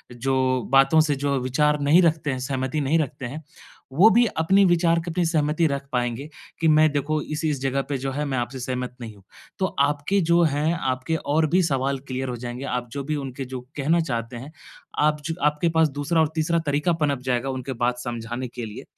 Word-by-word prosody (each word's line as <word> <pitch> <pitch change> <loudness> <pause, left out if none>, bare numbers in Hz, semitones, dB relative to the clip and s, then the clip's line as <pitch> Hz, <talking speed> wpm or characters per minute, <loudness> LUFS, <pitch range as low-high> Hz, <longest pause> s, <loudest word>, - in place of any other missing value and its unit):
जो 130 0 +1
बातों 135 +3 +5
से 150 -2 +1
जो 140 0 -1
विचार 150 +4 +1
नहीं 150 +5 +5
रखते 160 -3 +1
हैं 130 - -3
सहमति 130 +2 -2
नहीं 145 +4 +2
रखते 140 -3 -3
हैं, 145 +6 -7 0.5
वो 185 +10 +7
भी 240 +2 +5
अपने 190 +5 +4
विचार 170 -1 +3
की 170 +1 -5
अपनी 175 +1 0
सहमति 155 0 +1
रख 140 -1 -3
पाएँगे 125 +3 -2 0.3
कि 165 - +3
मैं 155 0 +5
देखो 150 +2 0
इस-इस 150 -3 -2
जगह 135 0 0
पे 140 - -1
जो 135 +1 -3
है 145 +3 -2
मैं 135 -2 -2
आपसे 120 +2 -4
सहमत 125 0 -4
नहीं 110 -2 -8
हूँ। 100 - -19 0.4
तो 190 - +2
आपके 145 +7 +1
जो 170 0 +5
हैं 155 +1 +1
आपके 130 +3 -1
और 155 +2 +1
भी 180 +4 +3
सवाल 135 -3 0
क्लियर 130 0 -3
हो 125 - -3
जाएँगे। 120 +2 -6
आप 125 -2 -3
जो 140 - -4
भी 155 +1 -1
उनके 135 -1 -5
जो 130 0 -6 0.2
कहना 155 +4 +2
चाहते 120 -6 -4
हैं, 135 +6 -9 0.5
आप 150 0 +2
छ - - -2
आपके 150 +3 +2
पास 160 -1 +3
दूसरा 145 +4 -1
और 160 - +3
तीसरा 160 +1 +1
तरीका 145 +4 +1
पनप 150 -4 0
जाएगा 130 0 -1
उनके 130 0 -4
बात 120 0 -1
समझाने 120 +1 -5
के 120 0 -7
लिए। 105 - -8
140 Hz, 215 wpm, -24 LUFS, 130-155 Hz, 0.5 s, वो